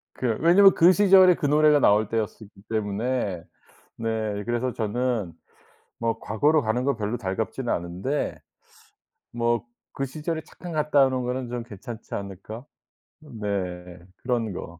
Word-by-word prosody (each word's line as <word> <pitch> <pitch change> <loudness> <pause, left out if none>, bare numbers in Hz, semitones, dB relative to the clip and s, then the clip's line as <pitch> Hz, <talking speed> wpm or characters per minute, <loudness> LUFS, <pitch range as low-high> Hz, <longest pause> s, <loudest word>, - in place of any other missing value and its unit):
그 120 -4 -1
왜냐면 190 +4 +6
그 175 +3 +6
시절이 190 -2 +6
그 145 - -1
노래가 150 0 +4
나올 105 -3 +4
때였었기 110 -2 -5
때문에. 105 -3 -2 0.6
네. 110 -2 -2
그래서 120 +1 -1
저는 115 -4 -2 0.7
뭐 115 -1 -1
과거로 145 +10 +2
가는 110 +3 0
건 140 -1 +1
별로 105 +1 -2
달갑지는 110 +5 -3
않은데 90 +12 -3 0.9
'뭐 120 0 0 0.3
그 135 - -3
시절에 155 +4 -4
잠깐 175 -1 -10
갔다 150 -3 +3
오는 130 -1 -1
거는 125 0 -3
좀 120 -1 -4
괜찮지 110 +1 -9
않을까?' 100 +4 -7 0.6
네. 95 - -5 0.2
그런 120 -4 -1
거. 85 -1 -8
120 Hz, 270 characters per minute, -25 LUFS, 105-140 Hz, 0.9 s, 왜냐면